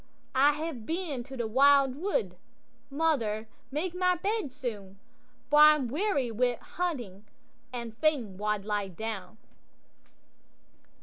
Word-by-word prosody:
'—'I 280 Hz, +3 st, +5 dB
hae 315 Hz, +3 st, -3 dB
been 285 Hz, +1 st, -4 dB
to 270 Hz, 0 st, -9 dB
the 235 Hz, -, -1 dB
wild 275 Hz, +3 st, +5 dB
wood; 405 Hz, -, -1 dB, 0.5 s
mother, 265 Hz, -8 st, 0 dB, 0.2 s
make 320 Hz, +6 st, -2 dB
my 365 Hz, 0 st, +2 dB
bed 400 Hz, -4 st, -2 dB
soon, 215 Hz, -8 st, -6 dB, 0.5 s
For 295 Hz, -, +6 dB
I'm 300 Hz, -3 st, +7 dB
weary 285 Hz, -, 0 dB
wi' 245 Hz, +2 st, +1 dB
hunting, 240 Hz, -, -4 dB, 0.5 s
and 235 Hz, -3 st, -6 dB
fain 255 Hz, -8 st, 0 dB
wald 210 Hz, 0 st, -2 dB
lie 205 Hz, -2 st, -1 dB
down. 215 Hz, +2 st, -6 dB
265 Hz, 120 wpm, -29 LUFS, 220-310 Hz, 0.5 s, I'm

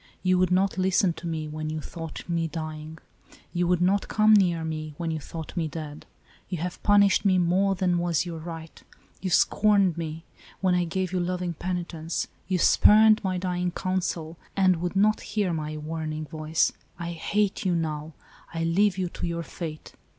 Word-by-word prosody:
You 185 Hz, -1 st, +3 dB
would 185 Hz, -1 st, +3 dB
not 190 Hz, +1 st, +1 dB
listen 185 Hz, -1 st, +3 dB
to 170 Hz, -, -8 dB
me, 160 Hz, -2 st, -3 dB
when 155 Hz, 0 st, -4 dB
you 155 Hz, 0 st, -3 dB
thought 165 Hz, +1 st, -8 dB
me 170 Hz, -1 st, 0 dB
dying. 155 Hz, -1 st, -6 dB, 0.6 s
You 175 Hz, 0 st, +1 dB
would 180 Hz, 0 st, +2 dB
not 195 Hz, +2 st, +2 dB
come 215 Hz, 0 st, +4 dB
near 175 Hz, -5 st, +3 dB
me, 155 Hz, -1 st, -5 dB
when 170 Hz, -2 st, -2 dB
you 160 Hz, -, -2 dB
thought 160 Hz, +3 st, -8 dB
me 165 Hz, -3 st, 0 dB
dead. 150 Hz, -1 st, -7 dB, 0.4 s
You 180 Hz, -, -2 dB
have 175 Hz, +2 st, -5 dB
punished 200 Hz, -1 st, +4 dB
me 190 Hz, -2 st, +4 dB
more 185 Hz, +3 st, +2 dB
than 180 Hz, -1 st, +1 dB
was 170 Hz, -2 st, +1 dB
your 170 Hz, -2 st, -5 dB
right: 165 Hz, 0 st, -8 dB, 0.4 s
you 190 Hz, -, -2 dB
scorned 200 Hz, -1 st, +3 dB
me, 160 Hz, 0 st, -5 dB, 0.3 s
when 185 Hz, -2 st, +2 dB
I 180 Hz, -1 st, +2 dB
gave 185 Hz, +1 st, -2 dB
you 185 Hz, -, 0 dB
loving 180 Hz, 0 st, -2 dB
penitence: 170 Hz, -1 st, -3 dB, 0.2 s
you 185 Hz, -1 st, +1 dB
spurned 215 Hz, +4 st, +6 dB
my 185 Hz, -1 st, 0 dB
dying 180 Hz, 0 st, -1 dB
counsel, 175 Hz, -3 st, -3 dB, 0.2 s
and 185 Hz, -2 st, +4 dB
would 175 Hz, +3 st, -3 dB
not 210 Hz, +2 st, +3 dB
hear 205 Hz, -4 st, -1 dB
my 155 Hz, -1 st, -3 dB
warning 155 Hz, 0 st, -4 dB
voice. 155 Hz, 0 st, 0 dB, 0.3 s
I 170 Hz, 0 st, -4 dB
hate 200 Hz, +4 st, -1 dB
you 180 Hz, -3 st, +1 dB
now! 155 Hz, -1 st, -3 dB, 0.4 s
I 165 Hz, -, -1 dB
leave 190 Hz, +3 st, +2 dB
you 185 Hz, -1 st, 0 dB
to 175 Hz, -, -4 dB
your 170 Hz, 0 st, -3 dB
fate. 160 Hz, -2 st, -7 dB
175 Hz, 185 wpm, -26 LUFS, 160-185 Hz, 0.6 s, spurned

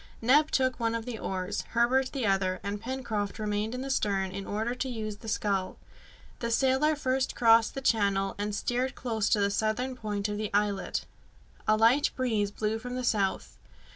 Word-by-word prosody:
Neb 290 Hz, +6 st, +4 dB
took 260 Hz, -1 st, +1 dB
one 230 Hz, -1 st, 0 dB
of 230 Hz, -1 st, -3 dB
the 240 Hz, -3 st, -5 dB
oars, 190 Hz, +2 st, -3 dB
Herbert 255 Hz, +3 st, +3 dB
the 265 Hz, -5 st, -2 dB
other, 190 Hz, -2 st, +1 dB
and 200 Hz, +1 st, -4 dB
Pencroft 230 Hz, -5 st, -3 dB
remained 215 Hz, +1 st, -2 dB
in 250 Hz, -, -4 dB
the 270 Hz, 0 st, -3 dB
stern 195 Hz, -6 st, 0 dB
in 195 Hz, +1 st, -6 dB
order 220 Hz, +4 st, -1 dB
to 255 Hz, +1 st, -3 dB
use 215 Hz, -3 st, -4 dB
the 225 Hz, -, -12 dB
skull. 200 Hz, -3 st, -1 dB, 0.6 s
The 235 Hz, -, -2 dB
sailor 265 Hz, +5 st, +3 dB
first 265 Hz, -2 st, -1 dB
crossed 230 Hz, -1 st, +5 dB
the 270 Hz, -, -3 dB
channel, 200 Hz, -5 st, +2 dB
and 205 Hz, 0 st, -2 dB
steered 250 Hz, +4 st, -1 dB
close 225 Hz, -5 st, -1 dB
to 210 Hz, -, +3 dB
the 200 Hz, 0 st, +2 dB
southern 220 Hz, +5 st, -1 dB
point 210 Hz, -3 st, -3 dB
of 205 Hz, 0 st, -3 dB
the 215 Hz, -1 st, -3 dB
islet. 205 Hz, -1 st, 0 dB, 0.6 s
A 215 Hz, -, +4 dB
light 235 Hz, +6 st, +4 dB
breeze 220 Hz, -6 st, 0 dB
blew 215 Hz, +2 st, -2 dB
from 250 Hz, +2 st, -6 dB
the 255 Hz, -, -3 dB
south. 205 Hz, -5 st, -1 dB
220 Hz, 190 wpm, -29 LUFS, 205-250 Hz, 0.6 s, crossed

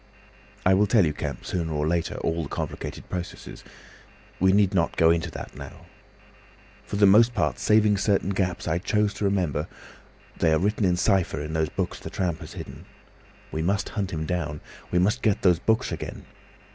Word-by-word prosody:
"I 95 Hz, -, +5 dB
will 100 Hz, +2 st, +4 dB
tell 105 Hz, -5 st, +4 dB
you, 75 Hz, -, 0 dB
Kemp, -, -, -5 dB
sooner 85 Hz, -3 st, -2 dB
or 75 Hz, 0 st, -1 dB
later, 85 Hz, 0 st, -1 dB
all 80 Hz, +1 st, -1 dB
the 70 Hz, -, -6 dB
complicated -, -, -5 dB
processes. 90 Hz, -1 st, -7 dB, 0.8 s
We 95 Hz, +1 st, +4 dB
need 100 Hz, -1 st, +3 dB
not 85 Hz, -3 st, +1 dB
go 80 Hz, 0 st, +5 dB
into 85 Hz, -1 st, 0 dB
that -, -, -8 dB
now. -, -, -10 dB, 1.0 s
For -, -, -4 dB
the 100 Hz, 0 st, +5 dB
most 115 Hz, +5 st, +6 dB
part, 75 Hz, -, 0 dB
saving 105 Hz, -1 st, +4 dB
certain 100 Hz, -1 st, +1 dB
gaps 95 Hz, -3 st, -1 dB
I 85 Hz, +1 st, +1 dB
chose 105 Hz, +2 st, +1 dB
to 105 Hz, -, -3 dB
remember, 90 Hz, -7 st, 0 dB, 0.7 s
they 80 Hz, -, +2 dB
are -, -, +4 dB
written 105 Hz, +4 st, +1 dB
in 90 Hz, -1 st, +2 dB
cypher 95 Hz, -5 st, +1 dB
in 75 Hz, +1 st, -5 dB
those 80 Hz, -1 st, 0 dB
books -, -, -3 dB
that -, -, -9 dB
tramp 85 Hz, -4 st, -1 dB
has 80 Hz, -, -10 dB
hidden. -, -, -9 dB, 0.7 s
We 80 Hz, -, -2 dB
must 100 Hz, +5 st, 0 dB
hunt 100 Hz, -3 st, -3 dB
him 80 Hz, -1 st, -3 dB
down. 75 Hz, -4 st, -2 dB, 0.3 s
We 90 Hz, -, 0 dB
must 105 Hz, +8 st, +2 dB
get 105 Hz, -3 st, +1 dB
those 90 Hz, -3 st, +4 dB
books 110 Hz, +6 st, +1 dB
again. -, -, -6 dB
90 Hz, 190 wpm, -25 LUFS, 80-100 Hz, 1.0 s, most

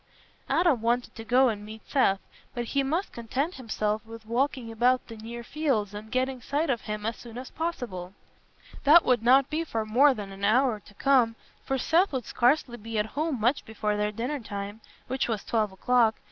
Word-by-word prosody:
Adam 330 Hz, -9 st, +3 dB
wanted 240 Hz, +2 st, 0 dB
to 225 Hz, -, -8 dB
go 250 Hz, +3 st, +4 dB
and 210 Hz, -2 st, -4 dB
meet 215 Hz, +1 st, -11 dB
Seth, 195 Hz, -9 st, +3 dB, 0.4 s
but 240 Hz, -1 st, -2 dB
he 275 Hz, +4 st, 0 dB
must 320 Hz, +8 st, -1 dB
content 260 Hz, +8 st, -2 dB
himself 215 Hz, -, -2 dB
with 225 Hz, 0 st, -11 dB
walking 250 Hz, 0 st, -1 dB
about 245 Hz, +3 st, +2 dB
the 230 Hz, -, -9 dB
near 230 Hz, +2 st, -8 dB
fields 235 Hz, -8 st, -1 dB
and 215 Hz, +1 st, -8 dB
getting 255 Hz, 0 st, -1 dB
sight 290 Hz, +4 st, 0 dB
of 235 Hz, -, -1 dB
him 210 Hz, 0 st, -5 dB
as 225 Hz, +1 st, -1 dB
soon 235 Hz, -1 st, -11 dB
as 255 Hz, +1 st, -7 dB
possible. 200 Hz, -, -4 dB, 0.7 s
That 315 Hz, +4 st, +7 dB
would 250 Hz, -3 st, +3 dB
not 255 Hz, +3 st, +5 dB
be 315 Hz, +2 st, 0 dB
for 225 Hz, -9 st, -3 dB
more 260 Hz, +6 st, +5 dB
than 200 Hz, -3 st, -7 dB
an 195 Hz, +1 st, -10 dB
hour 240 Hz, +1 st, +3 dB
to 205 Hz, -, -18 dB
come, 250 Hz, -2 st, +3 dB, 0.3 s
for 270 Hz, -, 0 dB
Seth 340 Hz, +8 st, +3 dB
would 255 Hz, -3 st, -2 dB
scarcely 245 Hz, 0 st, +2 dB
be 225 Hz, 0 st, -5 dB
at 210 Hz, -, +2 dB
home 300 Hz, -2 st, -1 dB
much 240 Hz, +6 st, +2 dB
before 210 Hz, -1 st, -2 dB
their 210 Hz, 0 st, 0 dB
dinner 245 Hz, +7 st, -3 dB
time, 205 Hz, -1 st, -6 dB, 0.2 s
which 260 Hz, +1 st, -1 dB
was 220 Hz, -4 st, -2 dB
twelve 215 Hz, -3 st, 0 dB
o'clock. 225 Hz, +3 st, +3 dB
240 Hz, 200 wpm, -27 LUFS, 215-270 Hz, 0.7 s, That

